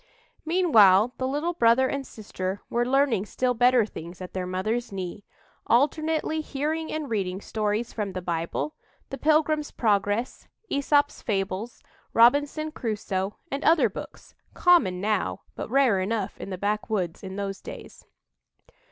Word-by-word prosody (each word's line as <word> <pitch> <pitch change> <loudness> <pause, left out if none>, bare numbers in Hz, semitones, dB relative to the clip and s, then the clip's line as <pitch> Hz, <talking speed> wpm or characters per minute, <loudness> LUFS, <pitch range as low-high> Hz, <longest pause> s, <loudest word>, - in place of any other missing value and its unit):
Meanwhile 235 - +5
the 260 - 0
little 295 +6 -1
brother 250 -3 +4
and 275 0 -3
sister 195 -2 -5
were 240 +1 +1
learning 270 -6 +2
still 250 +3 0
better 245 -1 +4
things 170 -3 -9
at 185 -1 -8
their 185 -1 -3
mother's 215 +7 -2
knee, 190 +1 -6 0.4
alternately 310 +4 +1
hearing 310 +2 -3
and 310 -2 -3
reading 195 -5 -2
stories 215 +2 -2
from 205 -3 -3
the 185 - -3
Bible, 170 - -2 0.4
"The 270 - -5
Pilgrim's 305 -1 +2
Progress," 205 +1 0 0.2
"Æsop's 285 +1 +2
Fables," 200 +2 -3 0.3
"Robinson 290 +6 +4
Crusoe," 210 -6 -3 0.2
and 275 +2 -3
other 325 +1 +4
books, - - -10 0.2
common 210 - +4
now, 210 -1 -1
but - - -6
rare 255 -6 +3
enough 200 +1 -2
in - - -6
the 185 - -4
backwoods 205 -3 -2
in 190 -1 -7
those 195 -1 -4
days. - - -10
230 Hz, 140 wpm, -26 LUFS, 195-280 Hz, 0.4 s, Meanwhile